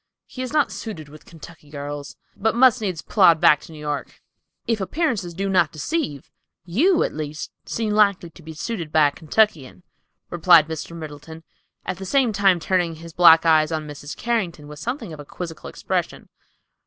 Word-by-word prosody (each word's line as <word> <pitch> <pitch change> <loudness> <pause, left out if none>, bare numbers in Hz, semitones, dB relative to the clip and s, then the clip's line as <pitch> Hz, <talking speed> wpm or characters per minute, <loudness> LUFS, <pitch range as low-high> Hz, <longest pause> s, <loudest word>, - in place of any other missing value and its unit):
"He 255 - -9
is 255 - -4
not 295 -8 +2
suited 185 -6 -7
with 155 +1 -15
Kentucky 165 -2 -14
girls, 145 -2 -7 0.2
but 220 +2 0
must 250 -1 +5
needs 185 -6 -3
plod 175 -6 +4
back 150 - +5
to - - -13
New 155 - -11
York." 150 -1 -5 0.5
"If 225 -3 -1
appearances 210 - -2
do 195 +2 -2
not 180 -5 +2
deceive, 155 - -4 0.3
you, 315 - +2
at - - -3
least, 150 0 -6 0.2
seem 225 -2 -2
likely 200 -5 +2
to 175 - -16
be 160 0 -10
suited 170 -3 -5
by 155 -2 +4
a - - -13
Kentuckian," 160 -1 0 0.5
replied 170 -2 +5
Mr. 160 +1 -6
Middleton, 155 +1 -10 0.4
at - - -4
the 190 - -7
same 250 0 +2
time 195 -3 +3
turning 175 -1 0
his 165 +1 -12
black 165 -1 +7
eyes 155 -1 +4
on 155 -1 -3
Mrs. 145 0 -8
Carrington 180 -11 -2
with 150 0 -10
something 235 - -5
of 155 - -10
a - - -7
quizzical 165 +1 -8
expression. - - -4
170 Hz, 180 wpm, -22 LUFS, 155-210 Hz, 0.5 s, black